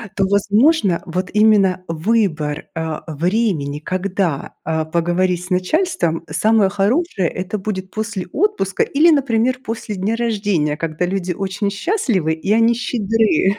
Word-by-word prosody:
то, 195 - +2
возможно, 205 - +3
вот 185 +1 -3
именно 210 -4 +4
выбор, 160 -4 0
э, 160 -1 -3
времени, 165 -3 -1
когда, 185 -2 -2
э, 160 0 -1
поговорить 175 +2 0
с 180 - -11
начальством 180 - 0
самое 210 +5 +3
хорошее- 205 - 0
это 185 +4 -4
будет 190 -2 -5
после 215 -4 -4
отпуска 340 - +1
или, 315 +4 +4
например, 255 -3 +1
после 220 -1 -5
дня 200 +4 -1
рождения, 200 -10 0
когда 165 +2 -2
люди 185 -1 -2
очень 195 +3 -2
счастливы 205 - 0
и 160 +5 -3
они 230 +1 +4
щедры. 225 -4 +1
195 Hz, 130 wpm, -19 LUFS, 175-225 Hz, -, именно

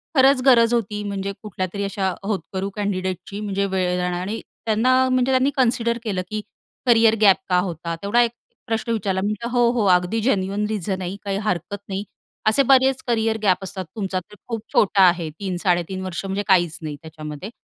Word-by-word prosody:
खरंच 270 -1 +5
गरज 240 -3 +6
होती 210 -2 -1
म्हणजे 200 -1 -3
कुठल्यातरी 195 -1 -4
अशा 195 -1 -1
होतकरू 195 -1 -3
कँडिडेटची 195 -1 -3
म्हणजे 200 -1 -1
वेळ 185 -2 0
जा 180 - 0
आणि 205 +5 -3 0.3
त्यांना 225 +3 +3 0.2
म्हणजे 255 +1 +2
त्यांनी 260 +2 +3
कन्सिडर 235 -2 +2
केलं 195 -5 -1
की 215 0 -3 0.5
"करियर 225 -2 +5
गॅप 200 -3 +7
का 180 0 +4
होता?" 170 0 -4
तेवढा 205 +4 +3
एक 235 -1 +2 0.4
प्रश्न 225 +1 -1
विचारला. 195 -4 -1
मी 200 - 0
म्हटलं, 215 +3 -3
"हो, 240 -1 +3
हो 235 -4 0
अगदी 180 +6 -2
जेन्युइन 200 -3 0
रिझन 195 -3 -2
आहे." 185 +1 -4
"काही 195 -1 -1
हरकत 180 +2 -2
नाही. 195 +1 -3 0.5
असे 275 +6 +3
बरेच 265 0 +3
करियर 225 -2 +1
गॅप 190 -1 +2
असतात. 190 -1 -5
तुमचा 195 -3 -2
तर 210 +3 -16
खूप 225 -3 -3
छोटा 200 -1 +4
आहे 170 -2 +1
3-3.5 185 -1 -1
वर्ष 185 +1 -4
म्हणजे 195 +1 -2
काहीच 175 -4 +3
नाही 150 -2 -5
त्याच्यामध्ये. 155 +3 -8
200 Hz, 180 wpm, -22 LUFS, 185-225 Hz, 0.5 s, गॅप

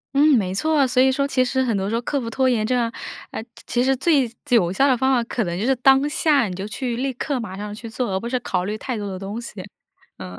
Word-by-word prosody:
嗯， 290 0 +5
没 185 -3 -2
错。 295 +3 +2
所 250 0 +3
以 265 0 +5
说 280 +1 0
其 255 -2 +2
实 260 +1 0
很 235 -4 0
多 195 0 -2
时 215 - -3
候 230 - 0
克 280 +4 -1
服 235 - -5
拖 260 +2 +2
延 220 -3 +1
症， 240 -1 0 0.4
诶， 220 - -6 0.2
其 245 +1 +1
实 265 0 +2
最 275 -2 +2 0.2
最 245 - +1
有 180 -5 +3
效 275 +8 +3
的 255 -3 +3
方 265 +1 +2
法 240 -2 +2
可 235 0 -2
能 175 -1 -3
就 215 - -1
是 270 - +3
当 270 +3 +4
下 295 -5 +2
你 180 - -5
就 195 +2 -5
去 240 +2 -3
立 265 +2 -2
刻 265 +2 -2
马 215 -5 -6
上 205 +1 -6
去 230 +1 -8
做， 225 -1 -3
而 190 - 0
不 230 - -5
是 250 +1 -1
考 180 -6 -2
虑 210 +2 -2
太 245 0 -4
多 205 -1 -4
的 190 -1 -5
东 200 +4 -5
西， 215 -5 -8 0.6
嗯。 90 -1 -8
240 Hz, 305 characters per minute, -22 LUFS, 210-265 Hz, 0.6 s, 嗯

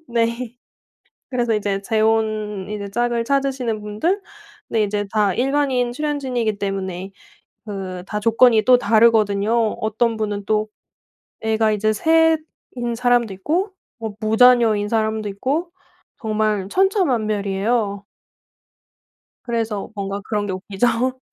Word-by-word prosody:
네. 235 +1 -1 0.8
그래서 240 -3 +1
이제 200 -2 -1
재혼 215 -2 0
이제 205 -1 -5
짝을 240 +1 0
찾으시는 260 -4 -1
분들. 320 - -1 0.5
근데 220 -2 +1
이제 205 0 -2
다 205 -3 +3
일반인 260 0 +1
출연진이기 260 -7 -1
때문에 190 -1 -3 0.6
그 190 -4 -6
다 210 - -3
조건이 230 0 +5
또 255 - +7
다르거든요. 220 -3 +3 0.3
어떤 220 +2 0
분은 205 -2 -2
또 215 0 +1 0.7
애가 220 0 +1
이제 215 +1 +1
3 325 +5 +4 0.4
인 240 -1 -2
사람도 240 -3 +2
있고 340 - -1 0.2
뭐 220 -3 -6
무자녀인 220 -2 +4
사람도 220 -1 0
있고 280 - -2 0.5
정말 215 -3 0
천차만별이에요. 215 - 0 1.4
그래서 225 -4 -2
뭔가 200 0 -4
그런 210 -2 -1
게 195 - -3
웃기죠. 230 +7 -1
220 Hz, 255 characters per minute, -21 LUFS, 205-245 Hz, 1.4 s, 또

